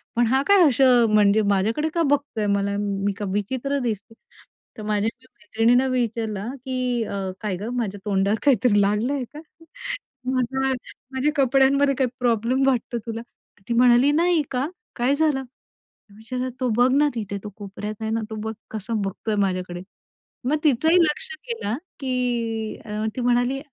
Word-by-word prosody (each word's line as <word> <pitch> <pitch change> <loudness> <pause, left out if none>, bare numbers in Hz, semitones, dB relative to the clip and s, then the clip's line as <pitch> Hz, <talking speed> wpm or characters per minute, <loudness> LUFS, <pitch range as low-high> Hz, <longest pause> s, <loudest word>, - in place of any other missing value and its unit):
पण 240 -1 +3
हा 265 +3 +3
काय 400 -2 +6
असं 250 -2 +5
म्हणजे 210 0 +5
माझ्याकडे 225 +11 +1
का 335 - +2
बघतोय 285 -7 0
मला 200 0 -1
मी 200 0 -1
का 210 - -3
विचित्र 260 +7 -1
दिसते? 220 -1 -3 0.6
तर 215 - -7
माझ्या 210 +1 0 0.3
मैत्रिणीनं 230 +5 +2
विचारला, 225 -4 -1 0.2
की 250 -2 -1
अ, 195 -2 -3
काय 205 -4 -2
गं 225 +5 -5
माझ्या 205 -4 -2
तोंडावर 200 +1 +1
काहीतरी 235 -5 +4
लागलं 210 +7 +1
आहे 275 -3 -1
का? 300 - -8 0.9
माझा 265 +1 0 0.4
माझ्या 265 +3 +1
कपड्यांमध्ये 275 +1 +4
काही 260 -2 +1
प्रॉब्लेम 240 +2 +1
वाटतो 245 -2 0
तुला? 230 0 -4
तर 235 -4 -24
ती 235 - +1
म्हणाली, 245 +3 +5
"नाही 335 +1 +3
का 255 +1 0 0.3
काय 250 +3 +2
झालं?" 300 -3 +1 0.8
विचारला, 250 +3 -4
"तो 255 - 0
बघ 250 +1 +5
ना 295 +1 +4
तिथे 205 -3 -3
तो 210 - -6
कोपऱ्यात 205 +1 -6
आहे 220 - -2
ना 225 0 0
तो 220 - -5
बघ 220 - -2 0.2
कसं 220 0 -3
बघतोय 200 +2 -2
माझ्याकडे." 180 -2 -2 0.7
मग 305 - +2
तिचंही 315 +4 +4
लक्ष 335 +11 -1 0.2
गेल, 225 - -2 0.3
की 240 -4 -2 0.4
ती 255 - -3
म्हणाली, 245 +2 +2
240 Hz, 155 wpm, -23 LUFS, 210-265 Hz, 0.9 s, काय